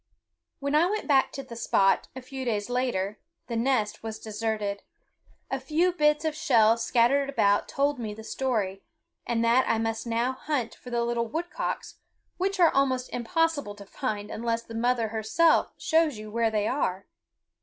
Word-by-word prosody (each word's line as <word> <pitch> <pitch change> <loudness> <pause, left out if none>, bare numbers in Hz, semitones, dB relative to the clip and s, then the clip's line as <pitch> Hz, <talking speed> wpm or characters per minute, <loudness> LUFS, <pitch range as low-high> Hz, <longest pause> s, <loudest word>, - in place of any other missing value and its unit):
When 280 0 -2
I 315 +4 +5
went 425 +3 -2
back 275 -3 +4
to 275 - -5
the 240 -3 -10
spot, 195 -4 +2
a 260 - -7
few 265 +1 -6
days 220 -2 -2
later, 215 -5 -1 0.3
the 235 - -4
nest 230 -3 0
was 220 -1 -5
deserted. 215 -2 -3 0.7
A 270 - -1
few 310 +7 +1
bits 300 -1 +2
of 315 - +1
shell 230 -7 +4
scattered 245 +4 +2
about 205 -7 +2
told 280 0 0
me 215 -3 -4
the 220 - -10
story, 215 -7 -2 0.5
and 230 -1 +1
that 245 +3 +3
I 230 - +3
must 225 +1 -2
now 235 +2 +1
hunt 260 -3 -3
for 250 - -12
the 235 -1 0
little 235 0 -1
woodcocks, 335 +8 -4 0.4
which 390 +1 -1
are 340 -2 +5
almost 260 -2 +1
impossible 285 -2 0
to 200 -1 -11
find 210 -2 -4
unless 230 0 -2
the 230 - -11
mother 230 0 +1
herself 225 +10 +2
show 325 0 +3
you 215 -8 -6
where 230 0 +1
they 215 -1 0
are. 195 -8 -1
235 Hz, 175 wpm, -27 LUFS, 220-275 Hz, 0.7 s, I